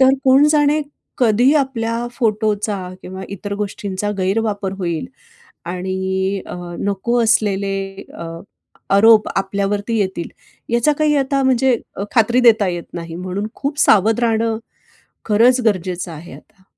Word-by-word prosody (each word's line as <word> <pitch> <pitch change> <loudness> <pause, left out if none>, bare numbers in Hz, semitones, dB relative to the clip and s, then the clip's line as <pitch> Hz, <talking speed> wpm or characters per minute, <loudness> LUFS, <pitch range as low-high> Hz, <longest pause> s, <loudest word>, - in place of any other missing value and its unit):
तर 265 0 +6
कोण 265 +2 +6
जाणे, 300 0 +3 0.4
कधी 245 +2 +4
आपल्या 240 -4 -1
फोटोचा 215 -3 0 0.2
किंवा 190 +1 -8
इतर 200 +1 -5
गोष्टींचा 205 -1 -3
गैरवापर 200 0 -1
होईल. 170 - -2 0.6
आणि 190 +2 -2
अ, - - -7 0.2
नको 215 +5 0
असलेले 200 -3 +1 0.3
अ, 170 - -7 0.7
आरोप 220 +1 +6
आपल्यावरती 200 +3 -1
येतील, 190 -4 -2 0.4
याचा 240 +5 +3
काही 305 -1 +3
आता 275 0 +1
म्हणजे 260 -1 +3 0.4
खात्री 240 +1 +4
देता 225 -4 +5
येत 175 -1 -3
नाही. 170 -1 -6
म्हणून 185 +3 -4
खूप 285 +1 -4
सावध 220 +3 +4
राहणं 225 -1 +1 0.7
खरंच 240 +4 +4
गरजेचं 185 -3 -1
आहे 160 +2 -10
आता. 195 -3 -17
210 Hz, 125 wpm, -19 LUFS, 190-240 Hz, 0.7 s, तर